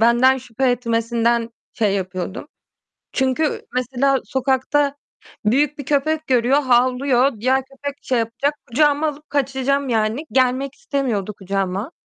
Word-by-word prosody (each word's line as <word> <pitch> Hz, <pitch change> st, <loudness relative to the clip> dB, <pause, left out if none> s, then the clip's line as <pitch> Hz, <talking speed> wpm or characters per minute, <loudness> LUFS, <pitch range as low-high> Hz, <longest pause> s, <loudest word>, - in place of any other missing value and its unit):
benden 240 Hz, +3 st, +5 dB
şüphe 255 Hz, +1 st, -1 dB
etmesinden 230 Hz, -1 st, 0 dB, 0.2 s
şey 210 Hz, -4 st, +1 dB
yapıyordum. 185 Hz, -, -4 dB, 0.6 s
Çünkü 265 Hz, +3 st, 0 dB
mesela 265 Hz, +2 st, +1 dB
sokakta 270 Hz, +2 st, 0 dB, 0.5 s
büyük 285 Hz, +6 st, +2 dB
bir 285 Hz, -, -5 dB
köpek 305 Hz, +3 st, 0 dB
görüyor, 255 Hz, +3 st, +3 dB
havlıyor. 255 Hz, 0 st, +2 dB
Diğer 260 Hz, +2 st, +2 dB
köpek 275 Hz, +1 st, -7 dB
şey 250 Hz, -2 st, 0 dB
yapacak, 235 Hz, +6 st, -1 dB
kucağıma 295 Hz, +4 st, +2 dB
alıp 300 Hz, 0 st, -7 dB
kaçacağım, 275 Hz, 0 st, 0 dB
yani. 225 Hz, +5 st, 0 dB
Gelmek 260 Hz, +2 st, +1 dB
istemiyordu 260 Hz, -, -2 dB
kucağıma. 195 Hz, -, -3 dB
260 Hz, 120 wpm, -20 LUFS, 230-280 Hz, 0.6 s, benden